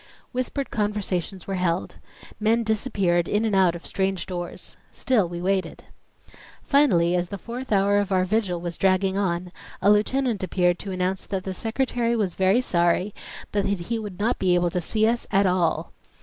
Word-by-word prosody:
Whispered 255 +2 -3
conversations 200 -4 -2
were 195 - -4
held. 175 0 -1 0.4
Men 225 +2 +2
disappeared 195 -6 +1
in 210 +2 +1
and 215 -3 +1
out 185 -3 +4
of 170 - -9
strange 190 -1 -1
doors. 175 -2 -6 0.2
Still 215 -9 +1
we 175 0 -5
waited. 190 -2 -1 0.8
Finally 180 -12 +3
as 175 0 -1
the 200 - -5
fourth 240 +5 -7
hour 200 0 +3
of 200 -1 -2
our 185 -1 +3
vigil 190 -3 0
was 170 0 -5
dragging 190 0 +2
on, 180 -2 -1 0.3
a 200 - +4
lieutenant 230 +1 +1
appeared 180 -1 +1
to 200 - -6
announce 185 +1 -2
that 195 -2 -3
the 190 - -4
Secretary 235 +3 -1
was 200 -6 0
very 190 +6 +3
sorry 175 -1 +1 0.4
but 205 -1 +1
that 200 -2 0
he 230 - 0
would 205 -4 -7
not 230 +4 0
be 180 -2 +3
able 175 -1 +1
to 180 - -1
see 215 +5 +1
us 235 +1 -1
"at 200 0 +3
all." 180 -3 0
195 Hz, 180 wpm, -24 LUFS, 180-215 Hz, 0.8 s, out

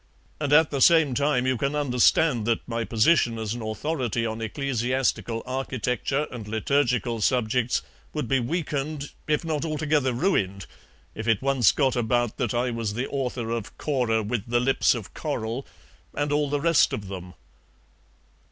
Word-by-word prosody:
And 145 -2 -2
at 155 +1 +5
the 140 -2 -2
same 160 -4 +5
time 140 -1 +1
you 130 -1 +1
can 140 +5 -1
understand 125 -2 +3
that 115 - 0
my 115 -1 -2
position 115 +1 +3
as 110 -1 -3
an 120 - -6
authority 115 +1 -2
on 110 0 -3
ecclesiastical 125 -1 -1
architecture 130 +2 -2
and 115 -4 -7
liturgical 120 0 0
subjects 125 +1 +1 0.3
would 150 - -3
be 135 -1 +2
weakened, 145 +1 -3 0.2
if 155 +2 0
not 155 -2 -1
altogether 150 -4 0
ruined, 105 - 0 0.5
if 110 +1 -6
it 115 +1 +2
once 135 -6 +4
got 135 -3 +1
about 120 -1 0
that 120 -2 -1
I 120 +1 0
was 115 -3 -3
the 125 +3 -2
author 125 -4 -3
of 115 -2 -4
'Cora 120 -7 0
with 110 +1 -3
the 120 0 +3
lips 130 +1 +3
of 110 -5 -7
coral' 125 -4 -4 0.5
and 145 0 -1
all 145 -1 +1
the 145 0 0
rest 165 +1 +3
of 100 -2 -4
them." 90 -2 -8
125 Hz, 160 wpm, -25 LUFS, 115-145 Hz, 0.5 s, at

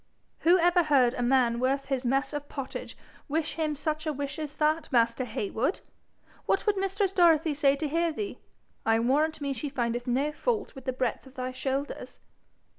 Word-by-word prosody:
'Who 345 +3 +5
ever 350 0 +4
heard 270 -6 +3
a 245 - -3
man 240 -1 +3
worth 270 +2 0
his 270 -2 -2
mess 270 +4 0
of 290 0 -5
pottage 275 -2 -6 0.3
wish 310 +1 -1
him 310 -2 -1
such 310 +2 -3
a - - +1
wish 285 +2 -4
as 300 -1 -5
that, 310 +1 +1
master 235 0 +2
Heywood! 225 - -2 0.7
What 390 - +1
would 420 -2 +3
mistress 390 0 0
Dorothy 330 -4 +4
say 280 -1 +3
to 305 +2 -2
hear 330 +3 +1
thee? 405 +6 -5 0.4
I 225 0 +3
warrant 300 +6 +1
me 280 -1 -1
she 275 +3 -4
findeth 240 -2 -2
no 270 +5 +1
fault 430 +6 -2
with 265 - -11
the 260 - 0
breadth 255 0 -2
of 265 - -17
thy 255 0 -3
shoulders.' 270 +2 -4
285 Hz, 190 wpm, -28 LUFS, 255-315 Hz, 0.7 s, Who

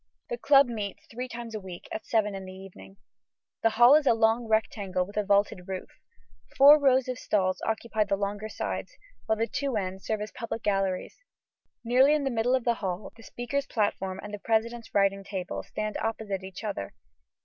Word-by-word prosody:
The 240 - -1
club 280 +2 +6
meets 215 -5 -5
three 250 +2 -5
times 235 -2 -7
a 215 - -3
week, 185 -3 -10
at 220 - -6
seven 210 -3 +1
in 195 -1 -6
the 185 - -8
evening. 180 - -12 0.6
The 225 - +4
hall 240 +4 +6
is 300 -1 +5
a - - +5
long 225 +1 +2
rectangle 200 -4 0
with 205 - -13
a 210 - +1
vaulted 200 -2 +1
roof. 190 -1 -5 0.7
Four 285 +2 +9
rows 265 -2 +3
of 255 0 -4
stalls 185 -2 0
occupy 220 -1 0
the 200 - +1
longer 205 +2 -3
sides, - - -5 0.3
while 220 - +2
the 225 - +1
two 270 +3 -2
ends 190 -1 -4
serve 215 -1 -1
as 210 - -5
public 230 -1 -5
galleries. 195 -2 -1 0.7
Nearly 260 +5 +5
in 300 - 0
the 270 - 0
middle 240 +2 +2
of 255 - -1
the 235 - +2
hall, 185 0 -4
the 230 - -15
speaker's 270 +5 -3
platform 195 -4 -1
and 210 0 -8
the 205 - -5
president's 230 +2 -1
writing 195 0 +2
table 185 - -4
stand 215 - -4
opposite 215 -4 -3
each 190 +3 -9
other. 200 - -4
215 Hz, 195 wpm, -28 LUFS, 195-235 Hz, 0.7 s, Four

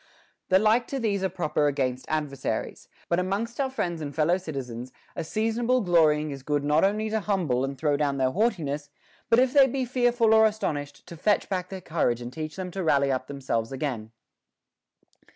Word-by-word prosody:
The 185 - +6
like 220 +4 +3
to 275 - -3
these 205 -5 0
are 190 - +1
proper 150 -4 0
against 130 -3 -1
adversaries; 150 -3 -3 0.2
but 170 - +1
amongst 205 +7 -2
our 270 - 0
friends 175 -10 -3
and 145 -2 -5
fellow 165 +3 +3
citizens 130 -8 -6 0.2
a - - -3
seasonable 225 +7 0
glory 165 -6 +4
ing 155 -1 -4
is 135 -1 -7
good 145 +1 -1
not 150 +2 +3
only 215 +2 +1
to 220 - +1
humble 180 -12 0
and 135 0 -3
throw 145 +1 +1
down 140 -2 0
their 130 -1 +1
haughtiness, 150 - -1 0.4
but 230 - +5
if 255 +1 +3
they 275 -2 +7
be 265 0 -2
fearful 245 -2 +2
or 220 0 +7
astonished, 150 -10 -4
to 175 - -10
fetch 205 +6 +1
back 185 -2 -2
their 190 -1 -7
courage 150 -9 0
and 120 +1 -7
teach 155 +1 -5
them 185 -1 -5
to 190 +1 -4
rally 140 -3 +3
up 130 -1 -2
themselves 130 -5 -2
again. 130 -6 -4
165 Hz, 195 wpm, -26 LUFS, 140-215 Hz, 0.4 s, they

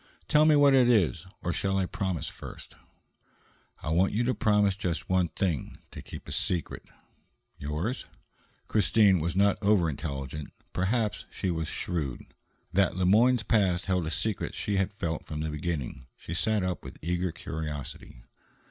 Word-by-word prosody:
"Tell 150 0 +5
me 155 -1 +6
what 145 -1 +6
it 125 -2 +6
is, 95 -6 +2 0.2
or 85 - 0
shall 95 0 0
I 95 - +2
promise 95 - -2
first?" - - -10 1.1
"I - - -3
want 90 +4 +3
you 115 +3 +1
to 125 +2 +1
promise 105 -4 +3
just 90 -4 -3
one 95 -1 +3
thing: 85 -3 -2
to - - -8
keep - - -9
a - - -7
secret." 85 -4 -2 0.7
"Yours?" 80 - -3 0.6
Christine 105 -2 +4
was 85 +2 -1
not 100 +2 +3
over 100 -4 +4
intelligent, 70 0 -5 0.2
perhaps, 105 +4 0
but - - -22
she 95 - -1
was 80 -1 -2
shrewd. 75 -8 -3 0.5
That 95 0 +3
Le 95 0 +1
Moyne's 115 +5 +5
past 95 -4 +2
held 90 -4 0
a - - -1
secret 105 +4 -2
she 100 -1 -1
had 95 +1 +1
felt 85 -6 -4
from 75 -1 -4
the 80 0 -2
beginning. 75 -5 -4
She 85 - -7
sat 105 +3 +1
up 90 -1 -2
with - - -9
eager 90 +1 0
curiosity. 75 -7 -6
95 Hz, 165 wpm, -28 LUFS, 80-105 Hz, 1.1 s, me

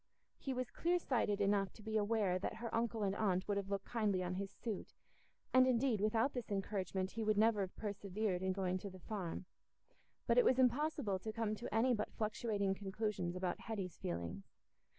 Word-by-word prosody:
He 270 - -3
was 255 -1 -2
clear 350 +1 +2
sighted 235 - +1
enough 200 -1 +2
to 215 - -14
be 220 0 -3
aware 205 -3 +2
that 205 - -3
her 230 +1 -5
uncle 230 -1 0
and 195 -1 +1
aunt 185 -3 +1
would 205 -1 +1
have 200 -1 -2
looked 200 -1 -2
kindly 210 -6 +1
on 180 0 -2
his 195 +1 -3
suit, 215 -1 -5 0.6
and 255 0 +7
indeed, 245 -3 +2
without 225 +5 +2
this 245 -3 -4
encouragement 195 -2 -1
he 225 - -3
would 215 -1 +2
never 215 -1 +4
have 190 -1 -3
persevered 200 -2 -2
in 190 0 +1
going 185 -1 0
to 200 - -6
the 185 - -10
Farm; 185 -3 -4 0.8
but - - +5
it - - +7
was 260 - +4
impossible 260 -5 +2
to 220 +4 -4
come 220 -1 -1
to 215 - -5
any 235 +4 +4
but 210 -2 -1
fluctuating 210 -2 0
conclusions 195 -2 -2
about 185 -1 -1
Hetty's 195 -6 -4
feelings. 85 +3 -4
210 Hz, 195 wpm, -38 LUFS, 190-230 Hz, 0.8 s, and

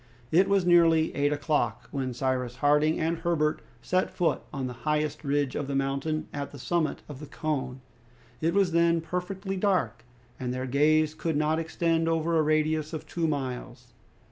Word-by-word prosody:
It 185 +4 +4
was 200 -2 +3
nearly 165 -2 +4
eight 145 0 +2
o'clock 150 +1 -1
when 135 -2 -2
Cyrus 125 -1 -2
Harding 150 +4 +3
and 165 +1 0
Herbert 155 -3 0 0.2
set 185 +1 +1
foot 175 - 0
on 135 -2 -3
the 125 - -4 0.2
highest 150 0 0
ridge 140 -2 0
of 140 - -2
the 140 - -2
mountain 140 +3 -1
at 140 -1 -4
the 145 - -11
summit 160 +4 -1
of 145 -3 -9
the 150 - -8
cone. 135 -4 -3 0.6
It 165 +3 +1
was 195 -3 +3
then 170 0 +3
perfectly 185 +4 -4
dark, 180 - 0 0.4
and 125 -2 -3
their 130 +1 -3
gaze 150 +3 +3
could 160 -1 -2
not 155 +1 +1
extend 165 0 0
over 165 +1 +1
a - - +5
radius 155 0 +1
of 155 - -5
two 170 -1 -1
miles. 135 -4 -4
155 Hz, 175 wpm, -27 LUFS, 140-165 Hz, 0.6 s, a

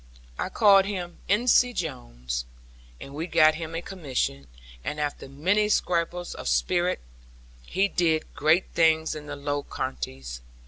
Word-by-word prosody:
I - - -1
called 195 -3 +6
him 180 -4 -5
Ensie 245 +3 +4
Jones; - - -4 0.5
and 140 - -10
we 160 +4 -4
got 155 -2 +5
him 160 +1 -6
a 165 - -3
commission, 130 - -3 0.4
and 150 - -4
after 145 -2 -3
many 190 +10 +1
scrapes 175 -2 0
of - - -7
spirit, 180 0 +1 0.7
he 195 +1 +2
did 165 -4 0
great 160 +5 +2
things 160 -1 +3
in 150 -1 -8
the 145 - -5
Low 145 0 -2
Countries. 60 - -5
160 Hz, 140 wpm, -26 LUFS, 140-180 Hz, 0.7 s, called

